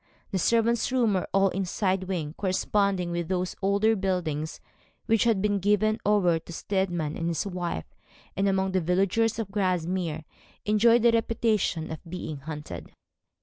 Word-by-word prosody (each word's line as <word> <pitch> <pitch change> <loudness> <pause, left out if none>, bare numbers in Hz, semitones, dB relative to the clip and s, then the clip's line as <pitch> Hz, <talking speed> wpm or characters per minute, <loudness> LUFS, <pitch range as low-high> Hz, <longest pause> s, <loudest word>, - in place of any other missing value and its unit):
The 190 - 0
servants' 230 +4 +2
rooms 240 -5 +2
were 185 - -1
all 195 0 +4
in 190 +2 -2
a - - -1
side 190 0 0
wing, 165 -6 -3
corresponding 190 -1 0
with 170 -1 -2
those 185 -1 -2
older 200 +3 +3
buildings 170 -6 -2 0.5
which 225 0 +3
had 220 -4 +2
been 205 -1 +1
given 210 +3 +2
over 190 -5 +3
to 165 - -12
Steadman 175 -4 -2
and 165 - -2
his 170 +1 -1
wife, 175 - -3 0.5
and 195 +1 +1
among 190 0 +1
the 185 -1 +1
villagers 195 +6 +1
of 220 -4 -4
Grasmere 180 -4 -1 0.4
enjoyed 230 +2 +4
the 235 - +6
reputation 225 -7 0
of 160 - -7
being 160 -4 -5
haunted. 150 +1 -8
190 Hz, 160 wpm, -27 LUFS, 175-210 Hz, 0.5 s, the